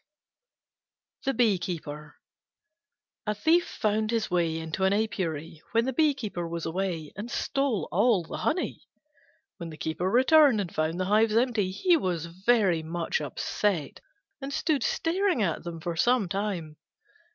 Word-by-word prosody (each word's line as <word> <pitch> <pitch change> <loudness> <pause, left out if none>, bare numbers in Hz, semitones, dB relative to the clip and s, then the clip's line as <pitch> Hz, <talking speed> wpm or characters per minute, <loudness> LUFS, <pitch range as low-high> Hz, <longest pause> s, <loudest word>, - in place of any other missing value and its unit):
THE 270 - +1
BEE 220 -6 +3
KEEPER 150 -4 -6 1.1
A 210 - 0
Thief 325 - +3
found 215 0 0
his 225 -4 -1
way 170 -2 +1
into 160 +3 -3
an 190 +1 +4
apiary 165 -7 -2
when 230 +1 +3
the 265 - -1
Bee 300 +1 +3
keeper 200 -9 -4
was 170 0 -4
away, 165 -3 -3
and 210 +4 -6
stole 275 -5 -1
all 205 0 +3
the 165 - -6
honey. 320 +4 -2 0.7
When 170 -1 -6
the 155 - -10
Keeper 160 +4 -2
returned 265 +1 +5
and 185 -4 -3
found 155 +3 -1
the 185 - 0
hives 215 +2 +3
empty, 230 -6 +1
he 335 - +3
was 175 - -2
very 190 0 +2
much 165 0 -2
upset 155 +2 -2 0.4
and 275 +1 -5
stood 310 -2 0
staring 345 - +1
at 165 -5 -1
them 170 -1 -6
for 170 +1 -4
some 240 +3 +2
time. 185 -5 -3
195 Hz, 150 wpm, -27 LUFS, 165-240 Hz, 1.1 s, returned